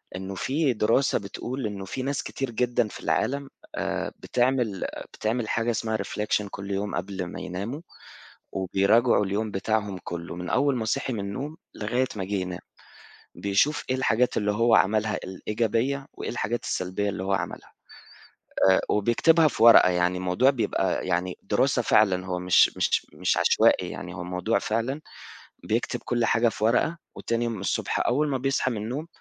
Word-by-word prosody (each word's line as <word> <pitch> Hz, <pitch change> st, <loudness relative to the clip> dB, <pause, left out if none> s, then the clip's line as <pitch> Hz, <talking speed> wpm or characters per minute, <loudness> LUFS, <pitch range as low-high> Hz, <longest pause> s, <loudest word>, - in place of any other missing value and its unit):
إنه 95 Hz, +1 st, -5 dB
في 140 Hz, -, 0 dB
دراسة 115 Hz, +5 st, +2 dB
بتقول، 120 Hz, +6 st, -5 dB
إنه 100 Hz, -2 st, -6 dB
في 115 Hz, +7 st, -5 dB
ناس 140 Hz, +1 st, -2 dB
كتير 135 Hz, -2 st, -4 dB
جدًا 120 Hz, 0 st, +1 dB
في -, -, -10 dB
العالم 140 Hz, 0 st, -1 dB, 0.3 s
آآ -, -, -2 dB
بتعمل 120 Hz, -6 st, 0 dB, 0.3 s
بتعمل 110 Hz, +1 st, -2 dB
حاجة 115 Hz, +1 st, +1 dB
اسمها 110 Hz, -1 st, -1 dB
Reflection 105 Hz, -1 st, -1 dB
كل 100 Hz, 0 st, -7 dB
يوم 100 Hz, +1 st, -2 dB
قبل 95 Hz, -2 st, -3 dB
ما 90 Hz, -, -7 dB
يناموا 105 Hz, -, -5 dB, 0.7 s
وبيراجعوا 100 Hz, +5 st, +3 dB
اليوم 105 Hz, +3 st, -2 dB
بتاعهم 105 Hz, 0 st, -1 dB
كله، 85 Hz, 0 st, -6 dB
من 90 Hz, +1 st, -6 dB
أول 140 Hz, 0 st, +2 dB
ما 115 Hz, -, -2 dB
صحي 130 Hz, +4 st, -1 dB
من 110 Hz, -, -3 dB
النوم، 130 Hz, +11 st, -5 dB, 0.2 s
لغاية 120 Hz, +5 st, 0 dB
ما 95 Hz, -, -2 dB
جه 100 Hz, +2 st, -4 dB
ينام، 90 Hz, -2 st, -3 dB, 0.7 s
بيشوف 100 Hz, +10 st, +1 dB
إيه 130 Hz, -, +2 dB
الحاجات 125 Hz, -1 st, +1 dB
اللي 105 Hz, -1 st, +1 dB
هو 115 Hz, +2 st, +3 dB
عملها 110 Hz, +1 st, +3 dB
الإيجابية 115 Hz, +8 st, -1 dB
وإيه -, -, -5 dB
الحاجات 120 Hz, 0 st, -2 dB
السلبية 95 Hz, +1 st, -2 dB
اللي 95 Hz, -2 st, -3 dB
هو 95 Hz, -, -1 dB
عملها. 95 Hz, -, -3 dB, 1.0 s
آآ 95 Hz, -, +5 dB
وبيكتبها 155 Hz, +10 st, +4 dB
في 130 Hz, -, -3 dB
ورقة 115 Hz, -5 st, +8 dB
يعني، 90 Hz, 0 st, +1 dB
الموضوع 95 Hz, +9 st, +3 dB
بيبقى 115 Hz, -6 st, -1 dB
يعني 90 Hz, +1 st, -1 dB
دراسة -, -, +1 dB
فعلًا، 95 Hz, -3 st, +3 dB
هو 90 Hz, -1 st, -2 dB
مش 90 Hz, 0 st, +4 dB
مش -, -, +1 dB
مش -, -, 0 dB
عشوائي -, -, +3 dB
يعني، 90 Hz, 0 st, -7 dB
هو 90 Hz, -, -6 dB
موضوع 90 Hz, +6 st, 0 dB
فعلًا 115 Hz, +7 st, -2 dB, 0.6 s
بيكتب -, -, -1 dB
كل 120 Hz, -1 st, +1 dB
حاجة 115 Hz, +1 st, +3 dB
في 105 Hz, -, -6 dB
ورقة 125 Hz, +9 st, +2 dB, 0.2 s
وتاني 115 Hz, 0 st, -1 dB
يوم 115 Hz, -3 st, -3 dB
الصبح 100 Hz, -, -1 dB
أول 145 Hz, +5 st, +2 dB
ما 140 Hz, -2 st, 0 dB
بيصحى 130 Hz, 0 st, 0 dB
من 115 Hz, -, -3 dB
النوم، 125 Hz, +10 st, -4 dB
110 Hz, 165 wpm, -26 LUFS, 95-125 Hz, 1.0 s, ورقة